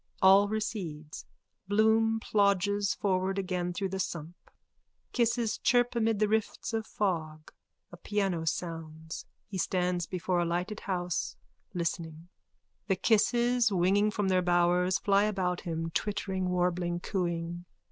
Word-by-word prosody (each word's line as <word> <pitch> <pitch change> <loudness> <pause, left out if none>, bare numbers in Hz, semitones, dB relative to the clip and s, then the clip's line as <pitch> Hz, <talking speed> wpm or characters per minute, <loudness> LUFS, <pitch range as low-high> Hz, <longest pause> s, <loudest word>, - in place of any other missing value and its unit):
All 195 +2 +6
recedes. 180 -9 -4 0.4
Bloom 220 +2 +3
plodges 200 -1 +2
forward 190 -1 0
again 180 -2 -1
through 195 +2 -2
the 190 +1 -4
sump. 170 -2 -4 0.8
Kisses 235 -1 +1
chirp 245 0 +2
amid 225 -2 +2
the 215 +1 +2
rifts 220 +2 -1
of 220 -1 -2
fog. 160 -6 -2 0.4
A 175 - -10
piano 195 -4 -1
sounds. 160 -1 -5 0.2
He 190 -3 -5
stands 180 -1 0
before 180 0 -1
a - - +2
lighted 180 +5 -2
house, 180 -3 -2 0.4
listening. 170 -1 -3 0.6
The 190 - +2
kisses, 235 +3 +3
winging 195 +3 +3
from 205 -1 -1
their 185 -1 +3
bowers, 175 +1 +3
fly 200 0 +3
about 185 -4 -1
him, 165 -2 -3
twittering, 190 -1 -2
warbling, 175 -1 0
cooing.) 175 -2 -3
185 Hz, 125 wpm, -30 LUFS, 175-210 Hz, 0.8 s, All